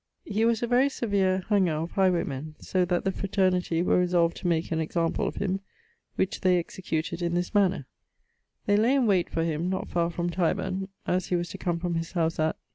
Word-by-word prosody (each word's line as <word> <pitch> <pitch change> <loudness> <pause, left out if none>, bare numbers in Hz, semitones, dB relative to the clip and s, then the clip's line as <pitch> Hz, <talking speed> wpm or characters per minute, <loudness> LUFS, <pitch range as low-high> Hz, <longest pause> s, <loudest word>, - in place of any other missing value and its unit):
He 215 +2 0
was 230 0 +1
a - - +1
very 250 +3 +4
severe 195 -7 0
hanger 190 -6 +3
of 160 +2 -3
highwaymen, 155 -6 0
so 185 -1 0
that 175 0 0
the 195 - +1
fraternity 185 -4 0
were 180 - +3
resolved 175 -2 +2
to - - -3
make 170 0 0
an 160 - 0
example 165 +1 0
of - - -4
him: 195 -1 -1 0.6
which 190 - -1
they 185 -1 +4
executed 165 -1 -3
in 170 0 0
this 175 +3 -1
manner: 195 -8 +2 0.8
They 205 0 +3
lay 235 +6 +3
in 265 -3 +3
wayte 190 -5 +2
for 165 - -1
him 165 +2 -1
not 190 0 -3
far 170 -1 +1
from 175 0 -2
Tyburne, 185 +2 -1 0.2
as 180 0 0
he 180 - 0
was 175 -1 -2
to - - -8
come 175 -1 -1
from 175 0 -2
his 165 +1 -3
house 165 -2 0
at 155 0 +1
180 Hz, 210 wpm, -27 LUFS, 170-195 Hz, 0.8 s, very